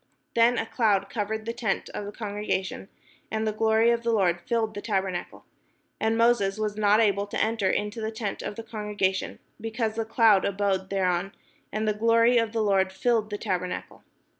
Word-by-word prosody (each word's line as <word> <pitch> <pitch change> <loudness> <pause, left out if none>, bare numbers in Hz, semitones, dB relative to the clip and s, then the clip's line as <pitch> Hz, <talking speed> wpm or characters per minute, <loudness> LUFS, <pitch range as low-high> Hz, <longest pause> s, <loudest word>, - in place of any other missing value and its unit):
Then 235 +1 +4
a - - 0
cloud 205 -5 +1
covered 220 0 -3
the 230 - -3
tent 230 -4 -2
of 205 - -4
the 205 - -6
congregation, 205 -2 -3 0.4
and 220 0 -1
the 215 - +1
glory 220 +1 +3
of 235 0 +1
the 235 0 0
Lord 180 -6 +2
filled 225 +2 -1
the 205 - -6
tabernacle. 190 -4 -3 0.5
And 220 +1 +1
Moses 230 -4 +3
was 215 -1 -2
not 210 0 +4
able 200 -2 +2
to - - -3
enter 220 -3 +1
into 210 +4 -2
the 220 - -2
tent 220 -2 -4
of 205 - -5
the 230 - -7
congre 210 -2 -6
gation, 190 0 0 0.2
because 225 0 -2
the 225 0 -2
cloud 220 -3 +4
abode 195 -1 0
thereon, 190 -1 0 0.4
and 215 +1 -2
the 215 - +2
glory 230 +2 +4
of 230 -1 -1
the 225 -1 0
Lord 190 -2 +2
filled 220 +2 +1
the 205 - -3
tabernacle. 180 -4 -4
215 Hz, 190 wpm, -26 LUFS, 195-225 Hz, 0.5 s, Then